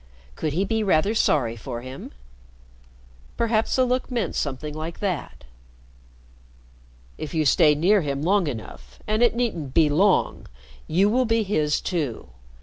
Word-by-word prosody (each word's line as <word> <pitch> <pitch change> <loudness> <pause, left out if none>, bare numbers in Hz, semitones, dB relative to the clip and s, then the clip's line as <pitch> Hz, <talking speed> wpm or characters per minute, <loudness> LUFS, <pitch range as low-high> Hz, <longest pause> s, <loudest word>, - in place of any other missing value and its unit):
Could 155 - -2
he 185 +5 0
be 220 +2 -1
rather 195 0 +2
sorry 130 - +1
for 120 +1 -6
him? 130 +2 -9 1.3
Perhaps 225 -1 +1
the 255 - +3
look 255 +1 -1
meant 240 -4 -2
something 145 +1 -3
like 160 +2 -6
that. 185 - -4 1.8
"If 155 0 -6
you 155 -1 +1
stay 150 +1 +5
near 190 +7 +3
him 140 -2 -3
long 190 0 +2
enough 65 - -8
and 215 +2 0
it 240 -1 +4
needn't 175 - -2
be 160 -3 +5
long 190 +6 +2 0.4
you 185 +5 +3
will 250 +4 +2
be 225 -1 +1
his 155 -7 0
too. 145 - -3
165 Hz, 145 wpm, -24 LUFS, 145-215 Hz, 1.8 s, stay